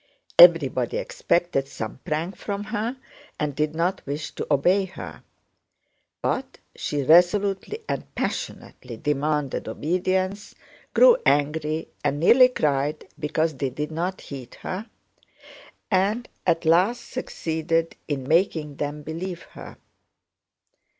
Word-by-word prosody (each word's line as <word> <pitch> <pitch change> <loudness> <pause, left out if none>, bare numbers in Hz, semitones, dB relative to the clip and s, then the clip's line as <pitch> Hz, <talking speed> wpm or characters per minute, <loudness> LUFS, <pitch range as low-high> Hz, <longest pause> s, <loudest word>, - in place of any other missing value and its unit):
Everybody - - +6
expected 175 - 0
some 115 -3 -6
prank 165 +5 -2
from 200 +2 -4
her 225 +4 -3 0.4
and 150 -2 -1
did 150 +1 -1
not 180 +3 0
wish 145 +2 -4
to - - -5
obey 180 +8 +3
her; 190 - -9 1.0
but - - -2 0.2
she 145 -1 -2
resolutely 195 - +3
and - - -4
passionately 120 -3 -5
demanded 150 +1 -1
obedience, 185 +4 -1 0.4
grew - - +7
angry 155 - +1
and 145 0 0
nearly 250 - +7
cried 150 - -1
because 155 +2 0
they 135 -1 -1
did 150 +4 -4
not 175 +4 -3
heed 130 -4 -9
her, 205 +5 -5 1.0
and 205 +6 +1 0.2
at 170 -1 +2
last 185 +9 +3
succeeded 165 -8 -2
in 135 -3 -3
making 160 -3 +1
them 150 0 -4
believe 170 +3 -5
her. - - -11
165 Hz, 115 wpm, -24 LUFS, 150-190 Hz, 1.0 s, grew